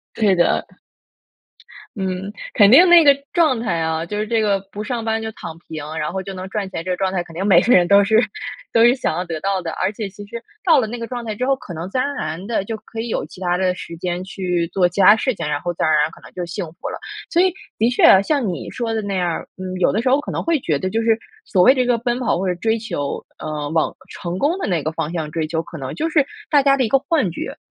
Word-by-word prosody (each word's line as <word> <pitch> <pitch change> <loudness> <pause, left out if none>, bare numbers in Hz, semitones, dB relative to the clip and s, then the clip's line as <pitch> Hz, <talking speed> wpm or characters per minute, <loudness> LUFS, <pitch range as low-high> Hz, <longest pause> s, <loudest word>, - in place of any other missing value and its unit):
是 205 -3 +3
的。 175 -1 +2 1.3
嗯， 190 0 -3 0.2
肯 205 -1 +6
定 345 +10 +8
那 345 -1 +8
个 285 -2 +7 0.2
状 315 -8 +3
态 225 -7 -1
啊， 160 0 -1
就 210 - -5
是 215 - -1
这 225 0 +1
个 200 -2 +1
不 210 +2 -6
上 235 0 -3
班 225 0 0
就 220 0 -4
躺 165 -5 -9
平， 160 -3 -8
然 150 +2 -2
后 190 - -3
就 195 - -7
能 185 0 -6
赚 200 -2 -3
钱， 165 - -5
这 185 - -4
个 180 - 0
状 190 0 -1
态 175 -2 -1
肯 165 - -14
定 180 +4 -3
每 190 -4 +6
个 245 - +3
人 175 -1 +5
都 200 0 +6
是 220 +2 +4 0.5
都 230 - +5
是 240 +1 +6
想 260 - -2
要 180 - -2
得 165 -2 -5
到 195 +1 0
的， 165 -2 -5
而 185 +5 -1
且 215 -1 -5
其 205 +1 -11
实 235 +3 -7 0.2
到 345 - +5
了 245 - +1
那 235 +2 -6
个 230 - -4
状 245 -2 -5
态 220 - -4
之 250 +4 -2
后， 270 0 +2
可 250 -10 -10
能 170 +4 -6
自 255 - -2
然 255 - +2
而 285 - -4
然 160 - -4
地 220 -3 -1
就 225 +2 -4
可 225 +1 -8
以 235 - -4
有 - - -2
其 - - -14
它 175 -1 0
的 185 -1 +1
时 170 -1 -8
间 175 +1 -3
去 180 -3 -2
做 180 -2 +3
其 180 +3 -4
它 200 +3 +8
事 255 +3 0
情， 150 - -4
然 145 -1 -1
后 175 - -2
自 - - -4
然 160 - +3
而 - - +4
然 150 +1 +1
可 - - -15
能 - - -14
就 180 -1 -4
幸 175 +3 -4 0.2
福 - - -4
了。 - - -6 0.3
所 345 - +3
以 375 -1 +3 0.2
的 230 +2 +2
确 195 -5 +6
像 275 -2 0
你 175 - -5
说 230 -2 -3
的 220 - -1
那 200 -1 -3
样 180 -1 0
儿， 170 - -4
嗯， 185 0 -6
有 - - +4
的 215 - 0
时 250 - 0
候 270 +3 +4
可 - - -7
能 - - -3
会 330 -3 +1
觉 155 - 0
得 185 - -2
就 225 +3 0
是 225 -1 +3 0.3
所 185 - +1
谓 260 - +7
这 255 - +1
个 245 -1 +2
奔 240 +1 -1
跑 230 -8 +1
或 190 - -2
者 180 - +1
追 220 +6 0
求， 145 -10 -4 0.2
呃， 150 -1 -4
往 160 0 +1 0.2
成 175 +1 -5
功 300 - +1
的 - - -2
那 175 -4 +1
个 155 - -1
方 160 0 -3
向 160 -3 -3
追 160 -1 -1
求， 160 0 -1
可 170 - -10
能 135 -3 -5
就 320 - -1
是 305 -3 +3 0.3
大 290 -2 +5
家 275 0 +4
的 265 - +1
一 - - 0
个 270 +4 +3
幻 270 - 0
觉， - - -6
200 Hz, 315 characters per minute, -20 LUFS, 175-235 Hz, 1.3 s, 定